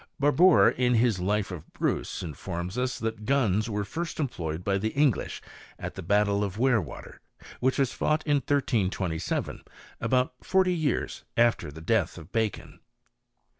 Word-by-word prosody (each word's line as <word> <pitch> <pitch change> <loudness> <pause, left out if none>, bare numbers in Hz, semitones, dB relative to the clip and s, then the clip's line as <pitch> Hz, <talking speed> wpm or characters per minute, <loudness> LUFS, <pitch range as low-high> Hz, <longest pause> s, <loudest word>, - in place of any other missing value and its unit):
Barbour, 155 +5 +6
in 125 -1 +1
his 115 -4 +3
life 100 +2 0
of 85 -4 -9
Bruce, - - -2
informs 85 +3 -5
us 125 0 -1
that 110 -1 -4
guns 115 -6 +2
were 105 -1 -2
first 165 - -5
employed 85 - -3
by 100 0 +1
the 110 +3 0
English 140 -6 +1 0.3
at - - -6
the - - -7
battle 100 +2 +2
of 100 0 -4
Werewater, 115 - -1 0.4
which 130 +1 +1
was 135 -3 +1
fought 155 +1 0
in 145 -2 +3
1327, 100 - -1 0.4
about 125 0 +1
forty 190 -1 +3
years 155 -6 -1
after 115 -10 +2
the 80 +2 -10
death 100 0 +1
of 85 +2 -11
Bacon. 110 -3 -2
110 Hz, 150 wpm, -27 LUFS, 95-135 Hz, 0.4 s, Barbour